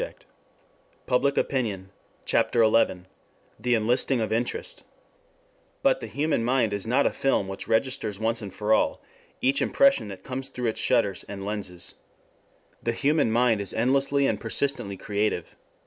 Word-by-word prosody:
SELF -, -, -4 dB, 0.9 s
INTEREST 135 Hz, +2 st, +2 dB
RECONSIDERED 105 Hz, -8 st, -1 dB, 0.4 s
CHAPTER 115 Hz, -, +3 dB
XI 110 Hz, -5 st, +2 dB, 0.6 s
THE 125 Hz, -1 st, +2 dB
ENLISTING 120 Hz, +3 st, +1 dB
OF 110 Hz, -1 st, -1 dB
INTEREST 120 Hz, -, -2 dB
I -, -, -32 dB, 1.0 s
BUT -, -, +4 dB
the -, -, -5 dB
human 150 Hz, -5 st, 0 dB
mind 120 Hz, -3 st, +2 dB
is 100 Hz, +1 st, -3 dB
not 130 Hz, +5 st, +3 dB
a -, -, +3 dB
film 135 Hz, -8 st, +1 dB
which 95 Hz, 0 st, -6 dB
registers 110 Hz, -3 st, 0 dB
once 115 Hz, +2 st, 0 dB
and 100 Hz, -2 st, -6 dB
for 105 Hz, +3 st, 0 dB
all -, -, +2 dB, 0.4 s
each 135 Hz, +2 st, +2 dB
impression 275 Hz, -, +3 dB
that 95 Hz, -2 st, -9 dB
comes 130 Hz, +1 st, -4 dB
through 125 Hz, -3 st, -2 dB
its 110 Hz, -, -3 dB
shutters 115 Hz, -7 st, +1 dB
and 100 Hz, -1 st, -6 dB
lenses. 100 Hz, -4 st, -5 dB, 0.9 s
The 115 Hz, -, -1 dB
human 145 Hz, -2 st, +2 dB
mind 115 Hz, -2 st, +3 dB
is 100 Hz, -, -4 dB
endlessly 135 Hz, +4 st, +2 dB
and 110 Hz, -5 st, 0 dB
persistently 115 Hz, -4 st, -2 dB
creative. 100 Hz, -4 st, -2 dB
115 Hz, 155 wpm, -26 LUFS, 105-135 Hz, 1.0 s, BUT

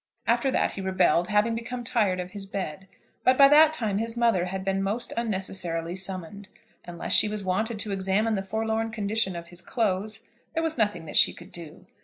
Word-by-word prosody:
After 235 Hz, +4 st, +2 dB
that -, -, +1 dB
he 195 Hz, -, -6 dB
rebelled, 185 Hz, -2 st, +2 dB
having 210 Hz, +3 st, +2 dB
become 240 Hz, +2 st, -5 dB
tired 210 Hz, -6 st, +1 dB
of 180 Hz, 0 st, -5 dB
his 200 Hz, -1 st, -7 dB
bed. 195 Hz, -2 st, -5 dB, 0.4 s
But 255 Hz, 0 st, +4 dB
by 275 Hz, -, +9 dB
that 305 Hz, +2 st, +7 dB
time 220 Hz, -9 st, -2 dB
his 230 Hz, +1 st, -2 dB
mother 230 Hz, -7 st, +2 dB
had 190 Hz, +1 st, -5 dB
been 195 Hz, 0 st, 0 dB
most 205 Hz, +5 st, -2 dB
unnecessarily 185 Hz, -6 st, -2 dB
summoned. 190 Hz, +1 st, -5 dB, 0.4 s
Unless 175 Hz, -1 st, -3 dB
she 210 Hz, -, +6 dB
was 210 Hz, -1 st, -4 dB
wanted 215 Hz, +5 st, -1 dB
to 210 Hz, -, -3 dB
examine 195 Hz, +3 st, 0 dB
the 195 Hz, -, 0 dB
forlorn 220 Hz, +3 st, -2 dB
condition 215 Hz, -3 st, -1 dB
of 170 Hz, 0 st, -8 dB
his 175 Hz, +1 st, -9 dB
clothes, 215 Hz, 0 st, -2 dB, 0.3 s
there 325 Hz, -, 0 dB
was 320 Hz, -1 st, -1 dB
nothing 205 Hz, -, 0 dB
that 150 Hz, -, -1 dB
she -, -, +6 dB
could -, -, -13 dB
do. 165 Hz, -3 st, -10 dB
200 Hz, 200 wpm, -26 LUFS, 185-225 Hz, 0.4 s, by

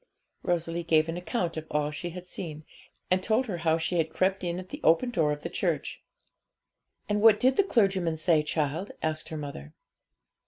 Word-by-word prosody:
Rosalie 170 Hz, -1 st, -1 dB
gave 160 Hz, -1 st, +3 dB
an 165 Hz, -, -3 dB
account 175 Hz, -1 st, -2 dB
of 160 Hz, 0 st, -5 dB
all 150 Hz, 0 st, 0 dB
she 175 Hz, +4 st, -5 dB
had 180 Hz, +1 st, -8 dB
seen, 155 Hz, -4 st, -7 dB, 0.5 s
and 185 Hz, 0 st, +3 dB
told 220 Hz, +6 st, +1 dB
her 195 Hz, -7 st, -3 dB
how 160 Hz, -1 st, +2 dB
she 165 Hz, +2 st, -1 dB
had 160 Hz, -1 st, +1 dB
crept 190 Hz, +1 st, +1 dB
in 175 Hz, -1 st, -1 dB
at 185 Hz, 0 st, -7 dB
the 290 Hz, -, -7 dB
open 245 Hz, +10 st, +4 dB
door 160 Hz, -9 st, +2 dB
of 150 Hz, 0 st, -4 dB
the -, -, -2 dB
church. -, -, -2 dB, 1.1 s
'And 210 Hz, 0 st, 0 dB
what 220 Hz, -1 st, +7 dB
did 260 Hz, +1 st, +4 dB
the 400 Hz, -, +4 dB
clergyman 195 Hz, -, +1 dB
say, 160 Hz, 0 st, +3 dB
child?' 150 Hz, +4 st, -2 dB
asked 155 Hz, 0 st, -2 dB
her 160 Hz, -, -5 dB
mother. 140 Hz, -, -7 dB
170 Hz, 195 wpm, -28 LUFS, 155-190 Hz, 1.1 s, what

